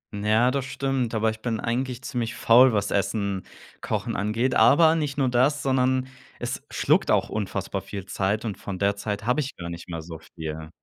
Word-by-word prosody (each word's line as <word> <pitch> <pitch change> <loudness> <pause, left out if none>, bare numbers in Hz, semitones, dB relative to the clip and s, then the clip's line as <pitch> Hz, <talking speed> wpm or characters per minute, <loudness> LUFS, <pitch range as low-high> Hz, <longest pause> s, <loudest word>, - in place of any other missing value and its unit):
Ja, 110 +4 +3
das 135 -1 -1
stimmt, 135 -4 -1
aber 110 0 +2
ich 110 - -9
bin 115 -1 -2
eigentlich 125 +1 -2
ziemlich 120 -4 -3
faul, 125 +3 +6
was 105 -2 0
Essen 100 0 -1 0.4
kochen - - -2
angeht. 110 +6 0
Aber 160 +5 +6
nicht 150 -3 -2
nur 135 -2 +2
das, 130 +4 +2
sondern 130 -1 +1 0.3
es - - -4
schluckt - - +2
auch - - +2
unfassbar 100 -2 -3
viel 95 +1 -7
Zeit 100 +3 -1
und 105 -4 -4
von 100 -2 -5
der 100 +1 +1
Zeit 105 0 -4
habe 125 +5 +2
ich 145 -1 -3
gar 85 -1 -7
nicht 85 +1 -9
mehr 80 -2 -5
so 80 -1 -9
viel. 80 -1 -7
110 Hz, 195 wpm, -25 LUFS, 100-130 Hz, 0.4 s, faul